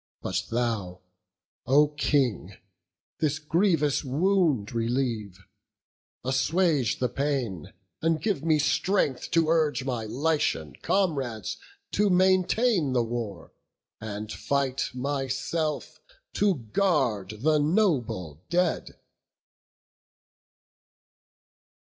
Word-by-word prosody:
But - - -2
thou, 110 -7 -2 0.7
O 145 +3 +5
King, 130 - 0 0.7
this 150 -2 +1
grievous 160 -2 +1
wound 150 - +1
relieve; 115 -4 -1 0.9
Assuage 135 - +1
the 125 - +1
pain, 125 - -2 0.3
and 165 -1 +1
give 205 -4 -1
me 160 -2 +3
strength 150 -2 +1
to 165 -2 +2
urge 155 -6 +2
My 120 -4 -2
Lycian 125 - 0
comrades 135 - -1 0.3
to 205 0 +2
maintain 185 - +3
the 120 -2 +2
war, 115 -7 -5 0.5
And 105 0 -6
fight 135 +5 -1
myself 140 +3 -2 0.3
to 200 -2 +2
guard 115 - 0
the 155 0 +4
noble 145 - 0
dead." 175 0 0
140 Hz, 90 wpm, -27 LUFS, 115-165 Hz, 0.9 s, O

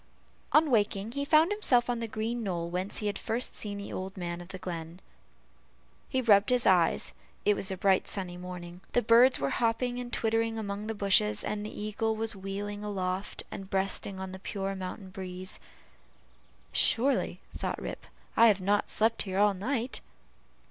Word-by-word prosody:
On 305 -1 +5
waking, 205 -1 +1
he 280 +3 -2
found 310 +5 +5
himself 260 - +3
on 240 -1 -1
the 230 - -3
green 225 +2 -2
knoll 170 -5 -2
whence 185 +3 -2
he 210 - -2
had 205 - -1
first 235 +3 -1
seen 205 -1 -3
the 200 - -6
old 190 +1 -5
man 175 -1 -4
of 175 - -10
the 190 +1 -7
glen. 170 -1 -6 1.1
He 260 -1 0
rubbed 205 -3 +5
his 250 -1 +3
eyes 180 -4 +3 0.3
it 210 - +5
was 195 - -2
a 190 - -3
bright 190 0 +3
sunny 185 -3 -3
morning. 180 0 -8
The 245 - +3
birds 235 +4 +6
were 140 - 0
hopping 245 +1 0
and 245 -1 -6
twittering 225 0 0
among 205 -1 -4
the 225 - -3
bushes, 190 - +3
and 210 0 -2
the 210 - -7
eagle 215 +1 -1
was 220 0 -2
wheeling 200 +2 -5
aloft, 190 -1 -3
and 195 -1 -7
breasting 195 0 -1 0.2
the 190 - -8
pure 195 0 -3
mountain 190 +1 -6
breeze. 185 0 -3 1.1
"Surely," 270 +5 +2 0.2
thought - - -3
Rip, - - -6 0.3
"I 230 - +7
have 205 -3 +4
not 205 +2 +1
slept 225 +1 +2
here 190 -2 -3
all 205 0 +5
night." 235 +5 -2
205 Hz, 175 wpm, -30 LUFS, 190-230 Hz, 1.1 s, I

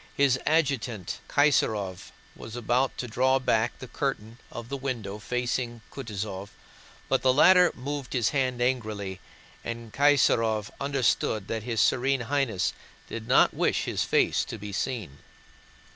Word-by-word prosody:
His 135 -2 +3
adjutant 130 - 0
Kaysárov 110 -10 +1 0.3
was 110 +1 -9
about 120 +3 0
to 125 - -4
draw 130 +3 +2
back 115 -3 +1
the 130 - -9
curtain 120 -4 -3
of 120 -1 -7
the 140 - -4
window 120 -7 -4
facing 120 0 -2
Kutúzov, 105 -5 -5 0.6
but - - +1
the 130 - +4
latter 180 +6 +6
moved 140 +1 -5
his 120 -4 +2
hand 130 -3 0
angrily 105 -7 -2 0.4
and 115 -2 -6
Kaysárov 115 -7 +3
understood 125 -6 0
that 110 -1 -2
his 115 0 -2
Serene 135 +1 +2
Highness 120 -7 0 0.4
did 115 -1 -6
not - - +5
wish - - +1
his - - -1
face - - +2
to - - -6
be 105 0 -7
seen. 95 - -3
120 Hz, 140 wpm, -27 LUFS, 110-135 Hz, 0.6 s, latter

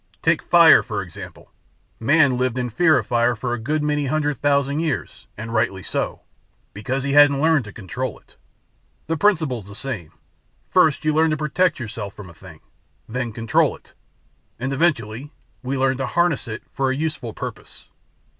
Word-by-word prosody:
Take - - +3
'fire' - - +7
for - - -4
example: - - -11 0.5
Man 140 +2 +4
lived 125 0 -1
in 125 -1 -2
fear 155 +5 +4
of - - -1
fire 120 0 +1
for 120 +2 -3
a 120 - -3
good 150 +6 -1
many 150 -1 0
hundred 150 -1 -1
thousand 140 0 +1
years 160 -5 -3
and 115 +2 -6
rightly 110 -5 0
so, - - -3 0.5
because 130 +6 -3
he 140 0 -1
hadn't 145 -1 +6
learned 155 -4 +3
to 105 - -9
control 95 -3 -5
it. - - -25 0.7
The 165 - -1
principle's 155 - +1
the 100 - -11
same; 110 - -5 0.6
First 155 0 +3
you 155 - +2
learn 160 +1 +3
to 155 - 0
protect 155 +3 +1
yourself 105 -4 -6
from 95 -4 -10
a - - -16
thing; - - -14 0.5
then 125 +1 -3
control 115 0 +1
it; - - -25 0.6
and, 130 +3 -3
eventually, 135 -3 -1 0.3
we 135 +4 -3
learn 130 0 +1
to 135 - -2
'harness' 175 -7 +1
it 110 0 -6
for 135 -1 0
a 130 - 0
useful 150 -6 -3
purpose." - - -8
135 Hz, 175 wpm, -22 LUFS, 115-150 Hz, 0.7 s, fire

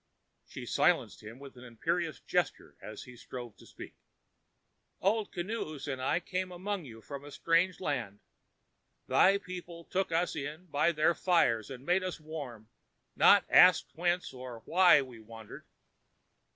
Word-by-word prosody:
She - - -8
silenced - - +1
him 110 +3 -10
with 140 0 -12
an 125 - -12
imperious 160 +7 -2
gesture - - -2
as 105 0 -9
he 125 - -13
strove 120 -2 -9
to - - -17
speak. - - -11 1.1
"Old 210 +2 0
Kinoos 170 -6 -5
and 135 -2 -4
I 130 - +1
came 185 +1 -4
among 185 0 -4
you 115 -3 -11
from 140 -1 -8
a 145 - -10
strange 170 +5 +1
land. 120 - -3 0.9
Thy 195 +2 +5
people 180 -3 -9
took 185 +1 -2
us 170 +2 0
in 150 +4 -6
by 150 0 +1
their 155 +1 +2
fires 160 - +2
and 130 0 -9
made 180 +3 +2
us 185 -2 -4
warm, 140 -8 -8 0.5
nor - - +7
asked - - +6
whence 175 -2 -1
or 125 -3 -9
why 175 -5 +5
we 125 -3 -12
wandered. 110 0 -12
155 Hz, 150 wpm, -31 LUFS, 125-180 Hz, 1.1 s, nor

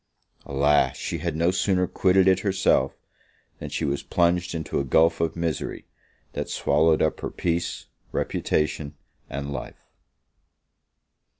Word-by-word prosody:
Alas! 70 +1 +2
she 85 - -3
had 85 -1 -2
no 85 +3 +2
sooner 95 0 +1
quitted 95 +1 +3
it 95 -1 +5
herself, 95 -1 +1 0.6
than - - -6
she - - -2
was 70 0 -1
plunged 85 0 +1
into 80 -1 -2
a - - 0
gulph 80 +5 +3
of 85 - 0
misery, 85 -3 -3 0.5
that - - -4
swallowed 80 +2 +2
up 80 - 0
her - - -4
peace, 85 0 -2 0.3
reputation, 75 -1 -1 0.3
and 70 +1 -4
life. - - -8
80 Hz, 130 wpm, -25 LUFS, 75-90 Hz, 0.6 s, it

